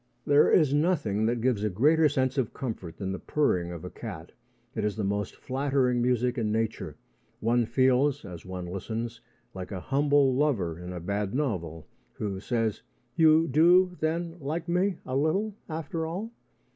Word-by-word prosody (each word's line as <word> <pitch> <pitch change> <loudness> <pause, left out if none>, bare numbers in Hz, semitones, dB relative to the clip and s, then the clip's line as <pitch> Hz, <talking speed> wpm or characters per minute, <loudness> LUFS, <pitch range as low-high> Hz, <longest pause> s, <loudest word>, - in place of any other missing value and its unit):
There 145 +1 +5
is 150 -6 +4
nothing 145 - +1
that 120 0 0
gives 120 -4 +1
a 105 - +1
greater 150 - +4
sense 130 -1 0
of 125 - -2
comfort 110 -10 -5
than 95 -2 -3
the 95 - -4
purring 90 -13 0
of 85 0 -7
a 90 - -7
cat. 90 -8 -8 0.4
It 110 - -3
is 105 -1 0
the 110 - -3
most 100 0 -2
flattering 130 -2 0
music 125 0 +1
in 110 -2 0
nature. 110 0 -2 0.4
One 115 +1 +2
feels, 130 +1 +2
as 85 -4 -9
one 90 -1 -6
listens, 115 +6 -5 0.3
like 95 0 -7
a 95 - -4
humble 140 +3 +2
lover 115 - 0
in 90 +1 -7
a 90 - -5
bad 100 +5 -2
novel, 85 - -2 0.3
who 100 -3 -4
says: 115 0 -1 0.3
"You 160 0 +5
do, 175 +5 +5
then, 165 +2 -2
like 160 +4 -3
me 180 +1 +1
a 130 - -3
little 180 +10 +1 0.2
after 160 +1 -3
all?" 195 +8 -5
125 Hz, 170 wpm, -28 LUFS, 100-150 Hz, 0.4 s, There